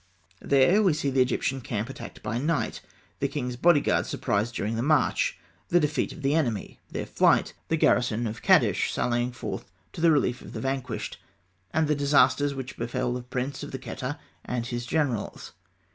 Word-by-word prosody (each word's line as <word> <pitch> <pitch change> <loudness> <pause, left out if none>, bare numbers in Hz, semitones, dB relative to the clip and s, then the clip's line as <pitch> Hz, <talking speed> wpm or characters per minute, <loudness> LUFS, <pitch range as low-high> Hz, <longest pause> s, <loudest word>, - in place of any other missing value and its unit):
There 140 +10 +4
we 190 -6 +4
see 140 -2 -1
the 130 0 +3
Egyptian 130 +1 0
camp 115 -4 -3
attacked - - -9
by 115 +3 -2
night; 155 +4 -1 0.4
the 140 - +1
king's 125 -3 -3
bodyguard 155 +3 +3
surprised 110 +4 -1
during 110 +2 -1
the 115 - -1
march; 150 +1 +2 0.3
the 175 - +4
defeat 150 -1 0
of 155 - -10
the 135 +1 +2
enemy; 120 -10 -1
their - - -4
flight; - - +3
the 165 - +1
garrison 120 -5 +2
of 110 0 -4
Kadesh - - +4
sallying 120 0 0
forth 125 - -6 0.2
to - - -6
the 170 - +6
relief 135 -5 +2
of - - -11
the - - -4
vanquished; 135 -1 -3 0.5
and 160 0 +2
the 150 - +3
disasters 140 -1 +3
which 130 -1 -6
befell 120 +1 -1
the 125 - -3
prince 125 +2 -4
of 145 - -6
the 130 - -5
Kheta 135 +3 -5 0.3
and 120 -2 -3
his 120 0 -4
generals. 140 -9 -1
130 Hz, 180 wpm, -27 LUFS, 120-145 Hz, 0.5 s, the